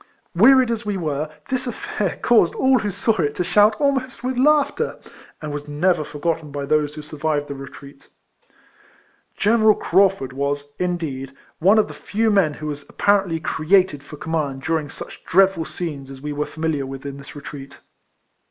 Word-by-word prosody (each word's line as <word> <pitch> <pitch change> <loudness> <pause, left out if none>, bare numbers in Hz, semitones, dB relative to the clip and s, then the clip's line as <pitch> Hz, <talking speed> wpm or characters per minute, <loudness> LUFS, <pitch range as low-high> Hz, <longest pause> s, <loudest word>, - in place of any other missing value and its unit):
Wearied 250 +6 +6
as 230 -1 -2
we 205 -2 -2
were, 155 -3 -2 0.2
this 255 0 -1
aifair 210 -4 -3
caused 225 -8 +4
all 260 -1 +3
who 210 - -2
saw 210 +3 0
it 145 -1 -1
to 180 - 0
shout 210 +4 +4
almost 265 -3 0
with 255 +1 -1
laughter, 290 +2 +2 0.5
and 150 - -4
was 145 0 -5
never 155 +3 +1
forgotten 155 +1 -3
by 140 0 -4
those 150 0 +1
who 150 - -7
sur 150 +1 -10
vived 150 -1 0
the 140 - -6
retreat. 140 0 -12 1.3
General 220 0 +4
Craufurd 185 -8 +2
was, 145 +1 -3
indeed, 155 -7 -3 0.3
one 195 +6 +5
of 215 - +4
the - - -9
few 220 +2 0
men 180 -8 +3
who 155 - -8
was 145 -1 -5
apparently 195 -5 +2
created 160 0 +2
for 150 +1 -11
com 160 - -7
mand 140 -4 -2
during 160 -2 -1
such - - -10
dreadful 190 -3 +3
scenes 150 -7 -6
as 135 -1 -9
we 150 +2 -5
were 150 +1 -2
familiar 155 -4 -2
with 135 +1 -8
in 140 -1 -6
this 140 +2 -12
retreat. 140 -1 -9
160 Hz, 180 wpm, -21 LUFS, 145-205 Hz, 1.3 s, Wearied